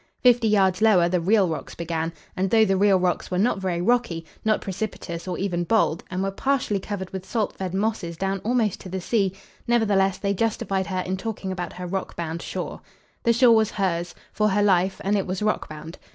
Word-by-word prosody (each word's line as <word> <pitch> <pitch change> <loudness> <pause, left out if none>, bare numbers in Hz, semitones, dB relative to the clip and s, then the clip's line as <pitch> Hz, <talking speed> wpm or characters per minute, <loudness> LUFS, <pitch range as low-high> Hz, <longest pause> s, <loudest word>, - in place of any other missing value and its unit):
Fifty 245 -2 +5
yards 190 -3 +3
lower 200 -6 +5
the 180 +1 +1
real 195 +2 +3
rocks 160 - -5
began; 165 -1 -2 0.2
and, 190 +1 0
though 220 +1 +5
the 195 -2 +2
real 195 0 +4
rocks 180 -1 0
were 180 - -1
not 205 +1 +2
very 180 -3 -1
rocky, 195 -6 +1 0.2
not 220 -1 +2
precipitous 185 -3 -5
or 180 - -2
even 180 -3 -1
bold, 170 -3 +1
and 185 +1 -2
were 195 - -1
partially 250 -2 0
covered 190 -1 -5
with 190 -1 -5
salt 215 +1 -2
fed 190 -2 -4
mosses 195 -5 -1
down 195 +1 -1
almost 225 -2 0
to 185 - -9
the 190 +1 -3
sea, 195 0 +1 0.4
nevertheless 200 -5 +2
they 200 -1 -1
justified 195 -2 -1
her 185 -1 -1
in 185 +1 -3
talking 200 -2 -4
about 180 -2 -4
her 180 0 -6
rock 190 +1 -4
bound 165 0 -4
shore. - - -5 0.4
The 235 - +3
shore 235 0 +6
was 220 -1 +4
hers, 175 -4 -2 0.2
for 215 0 +2
her 205 +1 +2
life, 190 -1 +2
and 200 +2 +1
it 195 -2 0
was 185 +2 -2
rock 215 - 0
bound. 155 +2 -9
195 Hz, 210 wpm, -24 LUFS, 180-215 Hz, 0.4 s, shore